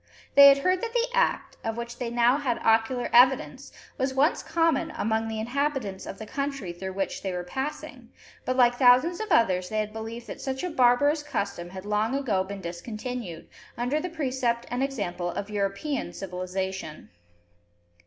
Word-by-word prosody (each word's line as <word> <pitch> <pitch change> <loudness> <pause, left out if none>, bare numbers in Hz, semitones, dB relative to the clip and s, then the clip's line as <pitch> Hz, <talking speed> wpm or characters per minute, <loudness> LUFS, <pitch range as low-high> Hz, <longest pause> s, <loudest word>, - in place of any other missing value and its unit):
They 280 0 +10
had 275 0 +8
heard 365 +6 +1
that 465 -1 -4
the 480 0 +2
act, - - 0
of 225 0 -3
which 235 +1 -6
they 245 -2 -2
now 240 +2 +3
had 260 -5 -1
ocular 225 +3 +2
evidence, 260 +2 +4 0.3
was 265 0 -1
once 285 +5 +3
common 330 -1 +1
among 220 +1 0
the 220 -1 -4
inhabitants 245 -4 -2
of - - -7
the 220 - -7
country, 275 -7 -4
through 190 +2 -6
which 195 0 -3
they 190 - -3
were 180 0 -3
passing, 265 +11 -6 0.3
but, 255 - -1
like 245 -1 +5
thousands 260 +7 +5
of 435 - -3
others, 185 - +3
they 215 - -3
had 215 0 -2
believed 225 +2 -6
that - - -8
such 265 +1 -3
a 360 - -2
barbarous 285 +3 +3
custom 200 -11 -4
had 190 +1 -9
long 210 +4 0
ago 225 -9 0
been 195 +1 -7
discontinued, 190 +1 -6 0.3
under 245 +5 0
the 360 - -4
precept 260 -7 -1
and 245 +1 -1
example 200 -10 -2
of 205 +4 -5
European 200 - -2
civilisation. 185 -2 -5
240 Hz, 175 wpm, -26 LUFS, 200-275 Hz, 0.3 s, They